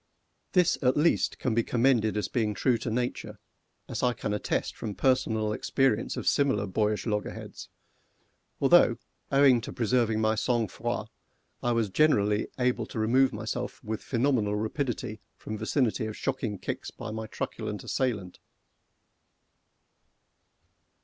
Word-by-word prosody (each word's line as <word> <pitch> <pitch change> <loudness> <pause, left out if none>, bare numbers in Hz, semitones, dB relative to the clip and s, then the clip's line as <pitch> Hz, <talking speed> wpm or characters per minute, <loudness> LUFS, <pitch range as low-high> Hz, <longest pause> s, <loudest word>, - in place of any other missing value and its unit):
This 180 -3 +3
at 130 0 +2
least 160 +3 +2
can 125 - -1
be 115 - +3
commended 115 -3 +2
as 105 - -1
being 110 -4 -1
true 120 +1 +2
to - - -3
nature, 120 +2 -3 0.5
as - - -4
I 125 -1 +2
can 105 -2 -3
attest 105 - -2
from 105 -2 -5
personal 110 -5 +1
experience 120 0 0
of - - -4
similar 135 -8 +2
boyish 105 +2 0
loggerheads, 105 -2 -4 0.9
although, - - +5 0.3
owing 135 -3 +5
to - - -7
preserving 115 -2 +1
my 110 0 +2
sang 115 -1 0
froid, - - -3 0.5
I 120 - +1
was 115 -4 0
generally 105 -7 +3
able 125 -3 0
to - - -8
remove 125 +5 +3
myself 115 +4 -4
with 110 -1 -4
phenomenal 120 -5 +1
rapidity 110 -1 -3 0.2
from 110 - -6
vicinity 115 -5 0
of 110 - -6
shocking 120 -6 -2
kicks - - -5
by 115 -2 -7
my 110 0 -5
truculent - - -5
assailant. 105 -9 -2
115 Hz, 135 wpm, -28 LUFS, 105-130 Hz, 0.9 s, although